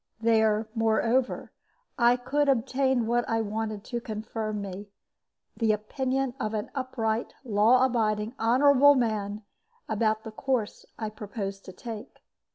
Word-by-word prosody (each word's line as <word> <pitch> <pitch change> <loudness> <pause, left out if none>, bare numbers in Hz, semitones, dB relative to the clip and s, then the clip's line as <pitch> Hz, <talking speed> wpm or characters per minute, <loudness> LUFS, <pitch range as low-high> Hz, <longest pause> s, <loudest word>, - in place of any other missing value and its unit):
There, 220 -1 +3
moreover, 225 +2 +1 0.4
I 240 -1 +4
could 280 +4 0
obtain 260 -1 +2
what 240 +1 +1
I 225 0 +1
wanted 215 -1 -3
to 240 +1 -4
confirm 215 -1 -4
me 200 +1 -7 0.7
the 225 -2 +2
opinion 260 +4 -1
of 215 -2 -2
an 210 - -4
upright, 235 -4 -2
law 235 +2 +4
abiding, 220 -3 0
honorable 280 +4 +6
man 215 -4 -1 0.4
about 220 0 0
the 220 - -7
course 245 -2 -2
I 220 -2 -4
proposed 200 -2 -6
to - - -8
take. 220 +2 -9
225 Hz, 130 wpm, -27 LUFS, 215-250 Hz, 0.7 s, honorable